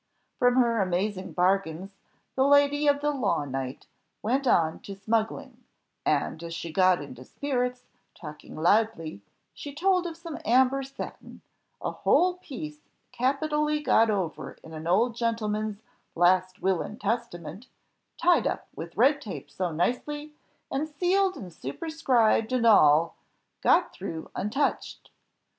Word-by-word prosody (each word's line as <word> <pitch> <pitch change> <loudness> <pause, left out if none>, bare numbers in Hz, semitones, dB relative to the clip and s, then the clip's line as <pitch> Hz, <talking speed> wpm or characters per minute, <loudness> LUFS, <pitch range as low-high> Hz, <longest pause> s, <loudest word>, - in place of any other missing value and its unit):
From 245 0 +4
her 235 -4 +3
amazing 190 +1 -2
bargains, 185 0 0 0.4
the 265 - +2
lady 285 +1 +4
of 285 0 +3
the 295 0 +1
law 230 - 0
knight 135 0 -5 0.4
went 260 +5 0
on 160 -7 +2
to 200 - -9
smuggling; 220 +2 -2 0.4
and, 160 - 0
as 165 0 -6
she 165 -1 -6
got 185 -2 +3
into 130 -3 -10
spirits, 250 - -2 0.3
talking 150 - -10
loudly, 170 - +1 0.3
she 285 -1 -9
told 365 +2 +2
of 330 -1 -7
some 335 -2 -7
amber 260 +3 +3
satin, 270 0 -9 0.4
a - - -1
whole 360 +1 +2
piece 155 - -8 0.3
capitally 300 +4 0
got 230 -6 +3
over 190 -6 -2
in 160 - -11
an 160 +1 -6
old 225 +7 +2
gentleman's 215 -2 -2 0.3
"Last 185 +2 +2
Will 190 -2 +2
and 215 - -7
Testament," 200 -3 -4 0.5
tied 350 0 +3
up - - -3
with 170 +2 -8
red 275 +6 +4
tape 145 - -8
so 175 +4 -2
nicely, 295 - -2 0.4
and 295 +3 -2
sealed 370 +5 +1
and 180 -4 -9
superscribed 235 - +1
and 250 -2 +1
all, 165 -7 +5 0.4
got - - +3
through 160 -1 -7
untouched! 270 +8 -2
225 Hz, 135 wpm, -27 LUFS, 175-280 Hz, 0.5 s, all